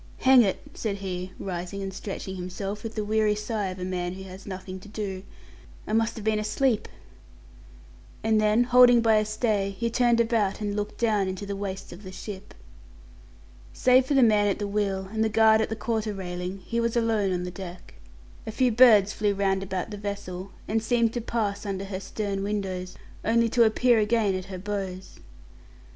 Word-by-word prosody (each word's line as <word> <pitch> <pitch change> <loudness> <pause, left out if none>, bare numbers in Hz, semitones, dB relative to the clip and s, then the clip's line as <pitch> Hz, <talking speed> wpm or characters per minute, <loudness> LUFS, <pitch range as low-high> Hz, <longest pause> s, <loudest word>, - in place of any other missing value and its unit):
"Hang 260 -1 +7
it!" 195 -4 +1
said 215 -3 -3
he, 185 -2 -5
rising 185 +1 -5
and 195 0 -5
stretching 190 0 -6
himself, 195 +3 -5
with 225 -1 -7
the 215 - -1
weary 215 0 +2
sigh 210 -1 -2
of 185 0 -5
a 180 - -4
man 180 -1 -2
who 190 +1 -8
has 190 +1 -11
nothing 190 -1 -6
to 185 - -14
do, 200 -3 -4 0.6
"I 215 - -4
must 225 0 +1
have 220 - -7
been 215 -1 +2
asleep"; 220 +2 0 1.4
and 220 -1 +3
then, 215 +3 +4
holding 245 -1 +6
by 225 -1 +4
a 215 - +2
stay, 215 -2 0
he 235 +2 -1
turned 240 -1 +3
about 225 -4 +1
and 205 -1 -2
looked 210 0 -3
down 215 -4 +2
into 190 +2 -4
the 200 0 -4
waist 195 -2 -5
of 175 - -12
the 185 -2 -9
ship. 190 0 -9 1.2
Save 255 0 +4
for 285 - +1
the 270 - +6
man 210 -2 +4
at 200 - +1
the 205 - -3
wheel 200 -2 -1
and 220 0 +1
the 220 - +1
guard 220 0 +5
at - - -1
the 220 - -2
quarter 220 -2 -2
railing, 180 0 -5
he 235 - -1
was 235 0 0
alone 220 -4 +1
on 180 -1 -1
the 180 - -5
deck. 180 -1 -9 0.5
A - - -2
few 250 +2 +2
birds 215 -4 +6
flew 205 -1 0
round 195 -1 +1
about 190 +1 -4
the 205 - -5
vessel, 200 -2 -5 0.2
and 220 +1 0
seemed 230 0 +1
to 240 - -2
pass 210 -3 -2
under 195 -2 -3
her 190 -1 -5
stern 195 0 -3
windows 190 -3 -3 0.3
only 230 +1 +3
to 235 0 +4
appear 235 +1 +3
again 215 -1 +2
at 185 -1 -4
her 190 -1 -7
bows. 190 -1 -5
205 Hz, 200 wpm, -26 LUFS, 190-225 Hz, 1.4 s, Hang